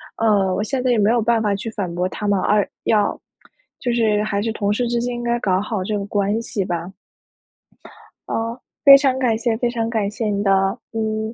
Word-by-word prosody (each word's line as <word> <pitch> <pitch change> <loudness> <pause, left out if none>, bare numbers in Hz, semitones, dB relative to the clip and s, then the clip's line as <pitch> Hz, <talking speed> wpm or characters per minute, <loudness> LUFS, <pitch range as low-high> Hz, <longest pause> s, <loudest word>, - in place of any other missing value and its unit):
呃， 200 -4 +2
我 205 - -1
现 260 +3 -2
在 255 - 0
也 240 - +3
没 210 +1 +3
有 235 0 +2
办 230 0 +2
法 210 -2 +1
去 200 +3 -4
反 190 -5 -4
驳 180 +1 -1
他 210 - -6
们， 200 -1 +2
而 205 +1 +2 0.2
要 210 -2 +1 0.6
就 245 - -1
是 220 -3 +2
还 200 -1 -1
是 225 - -2
同 205 -2 -1
事 240 +4 0
之 235 0 0
间 245 +1 -2
应 240 - -5
该 240 0 0
搞 185 -2 +1
好 210 -1 -3
这 210 +2 -2
个 200 - -4
关 205 +2 0
系 210 -3 -3
吧。 175 -1 -4 1.4
啊， - - -1 0.5
非 275 -1 +11
常 270 -2 +2
感 250 -4 +1
谢。 230 0 -1
非 240 +1 0
常 230 -1 -2
感 220 -4 -1
谢 220 +1 -3
你 205 -1 -1
的， 195 +1 +2 0.2
嗯， 220 0 -2
215 Hz, 240 characters per minute, -20 LUFS, 200-235 Hz, 1.4 s, 非